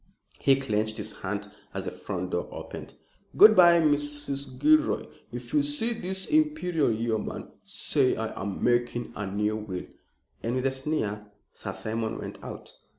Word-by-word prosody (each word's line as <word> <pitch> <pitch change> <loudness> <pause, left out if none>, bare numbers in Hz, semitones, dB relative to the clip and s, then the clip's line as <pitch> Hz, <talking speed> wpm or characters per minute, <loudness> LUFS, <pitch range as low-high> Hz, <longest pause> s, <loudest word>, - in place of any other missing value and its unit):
He 135 - +5
clenched 110 -4 -1
his 105 0 -3
hand 100 +1 -4 0.2
as - - -3
the - - -3
front 90 -2 -5
door 90 - -1
opened. - - -8 0.4
"Good 215 +1 +10
bye, 175 -2 +8
Mrs. 145 -3 0
Gilroy, 310 0 +4 0.3
if - - -7
you 300 - +5
see 285 -5 0
this 190 -2 -4
Imperial 300 - +2
Yeoman, 110 0 -2
say 135 -3 +1
I 110 0 -3
am 100 -1 -4
making 120 0 +1
a 105 - -3
new 105 +2 0
will," 100 -4 -5 0.6
and 115 +2 -1
with 130 0 -1
a 135 - +3
sneer 130 -7 -2 0.3
Sir - - -5
Simon 110 0 -2
went - - -8
out. - - -7
125 Hz, 155 wpm, -28 LUFS, 110-170 Hz, 0.6 s, Good